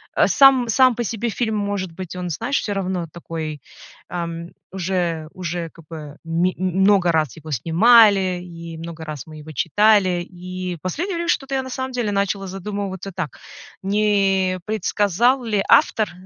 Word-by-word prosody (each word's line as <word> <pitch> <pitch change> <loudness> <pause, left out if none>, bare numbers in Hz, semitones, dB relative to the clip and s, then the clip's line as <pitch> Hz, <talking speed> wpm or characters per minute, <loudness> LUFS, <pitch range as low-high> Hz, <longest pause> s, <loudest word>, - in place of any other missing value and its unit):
э, - - +4
сам 265 -3 +5
сам 255 +1 +5
по 240 - -2
себе 230 +1 -3
фильм, 220 0 -1
может 200 -3 -2
быть, 180 +1 -8
он, 180 -1 -4
знаешь, 230 - -1
всё 205 - -3
равно 185 -3 -2
такой, 160 -3 -6 0.5
эм, 170 -1 -5 0.2
уже 175 -4 -2
уже 175 -2 -4
как 165 - -17
бы 150 -3 -8
ми 170 +3 0
много 185 0 +3
раз 155 -5 0
его 160 0 -10
снимали, 190 - +5
и 170 -2 -9
много 165 0 -8
раз 155 -3 -6
мы 155 -1 -11
его 155 +1 -10
читали, 185 - +3
и 180 0 -6
последнее 340 - -2
время 340 0 -2
что-то 270 -4 0
я 265 - 0
на 260 - -8
самом 260 +1 -3
деле 240 -4 -1
начала 200 0 -1
задумываться 195 0 -5
так, 175 -6 -5 0.4
не 195 -2 +1
предсказал 220 +4 +1
ли 210 -4 0
автор 215 -2 +4
185 Hz, 160 wpm, -21 LUFS, 170-210 Hz, 0.5 s, сам